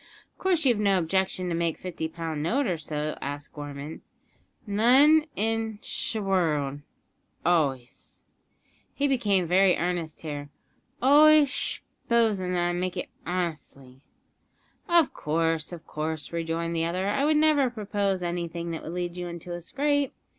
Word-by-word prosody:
"Of -, -, -41 dB
course 355 Hz, -5 st, +1 dB
you've 240 Hz, -5 st, +3 dB
no 200 Hz, -2 st, +3 dB
objection 185 Hz, +1 st, 0 dB
to -, -, -1 dB
make 170 Hz, -1 st, -1 dB
a -, -, -27 dB
fifty 175 Hz, -3 st, -4 dB
pound 160 Hz, -2 st, -5 dB
note 255 Hz, -, +1 dB
or 180 Hz, -7 st, -1 dB
so?" 150 Hz, 0 st, -3 dB
asked 145 Hz, +1 st, -6 dB
Gorman. 145 Hz, 0 st, -7 dB, 0.6 s
"None 265 Hz, +9 st, +5 dB
in 225 Hz, 0 st, -1 dB
sh' -, -, -1 dB
wo'ld; 160 Hz, -9 st, 0 dB, 0.7 s
always," 140 Hz, -8 st, -1 dB, 0.7 s
he 285 Hz, -, +1 dB
became 205 Hz, -9 st, +2 dB
very 185 Hz, +2 st, +4 dB
earnest 170 Hz, -3 st, -3 dB
here, 145 Hz, -2 st, -6 dB, 0.5 s
"always 300 Hz, +1 st, +7 dB
sh'posin' 220 Hz, -7 st, -1 dB
that 175 Hz, 0 st, +1 dB
I -, -, -1 dB
make 180 Hz, +1 st, -2 dB
it -, -, -4 dB, 0.2 s
honestly." 155 Hz, -7 st, -4 dB, 0.9 s
"Of 340 Hz, -4 st, +4 dB
course, 165 Hz, +1 st, -1 dB
of 170 Hz, -2 st, -9 dB
course," 155 Hz, 0 st, -4 dB
rejoined 165 Hz, 0 st, -2 dB
the 165 Hz, 0 st, 0 dB
other; 180 Hz, +3 st, -1 dB
"I 210 Hz, +7 st, +1 dB
would 305 Hz, +1 st, +3 dB
never 300 Hz, -4 st, +4 dB
propose 205 Hz, -4 st, -2 dB
anything 170 Hz, -1 st, -3 dB
that 165 Hz, -, -4 dB
would 165 Hz, -, -7 dB
lead 175 Hz, 0 st, -3 dB
you 175 Hz, 0 st, -4 dB
into 175 Hz, 0 st, -7 dB
a 175 Hz, -, -5 dB
scrape. 285 Hz, -, 0 dB
175 Hz, 150 wpm, -27 LUFS, 160-225 Hz, 0.9 s, always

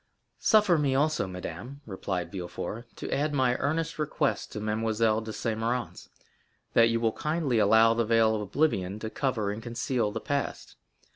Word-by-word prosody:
"Suffer 210 Hz, -6 st, +4 dB
me, 140 Hz, -3 st, +1 dB
also, 150 Hz, -5 st, +1 dB
madame," 95 Hz, -, -7 dB
replied 95 Hz, -3 st, -4 dB
Villefort, 100 Hz, +5 st, -5 dB
"to -, -, -4 dB
add 150 Hz, +1 st, 0 dB
my 130 Hz, -2 st, +3 dB
earnest 160 Hz, +3 st, -1 dB
request 150 Hz, -, -1 dB
to -, -, -5 dB
Mademoiselle 110 Hz, +1 st, +1 dB
de 110 Hz, 0 st, -6 dB
Saint 110 Hz, 0 st, -2 dB
Méran's, 120 Hz, +2 st, -3 dB, 0.6 s
that 115 Hz, 0 st, +6 dB
you 115 Hz, 0 st, +1 dB
will 115 Hz, -1 st, +2 dB
kindly 150 Hz, -6 st, 0 dB
allow 110 Hz, +1 st, +6 dB
the 115 Hz, 0 st, +1 dB
veil 115 Hz, 0 st, +3 dB
of 105 Hz, -, -2 dB
oblivion 105 Hz, -5 st, 0 dB
to 110 Hz, 0 st, -5 dB
cover 120 Hz, -8 st, -1 dB
and 105 Hz, +2 st, -5 dB
conceal 120 Hz, -1 st, -1 dB
the -, -, -3 dB
past. 140 Hz, -1 st, -3 dB
115 Hz, 165 wpm, -28 LUFS, 110-140 Hz, 0.6 s, that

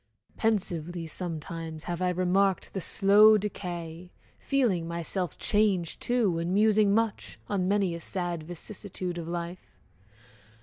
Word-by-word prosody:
Pensively 175 Hz, -6 st, -1 dB
Sometimes 165 Hz, -1 st, -5 dB
have 175 Hz, 0 st, -4 dB
I 180 Hz, -, +2 dB
remarked 185 Hz, +1 st, +1 dB
the 190 Hz, -, -3 dB
slow 210 Hz, +4 st, +6 dB
decay, 175 Hz, -4 st, -5 dB, 0.3 s
Feeling 225 Hz, -12 st, +1 dB
myself 170 Hz, +1 st, -2 dB
changed, 200 Hz, -6 st, +1 dB
too, 225 Hz, -9 st, +1 dB
and 170 Hz, +3 st, -1 dB
musing 210 Hz, -1 st, +4 dB
much, 225 Hz, -2 st, -1 dB
On 190 Hz, -3 st, 0 dB
many 195 Hz, -3 st, +1 dB
a 170 Hz, -, -5 dB
sad 175 Hz, -1 st, -3 dB
vicissitude 180 Hz, +1 st, -6 dB
of 165 Hz, -, -6 dB
life! 170 Hz, +1 st, -6 dB
180 Hz, 125 wpm, -28 LUFS, 170-205 Hz, 0.3 s, slow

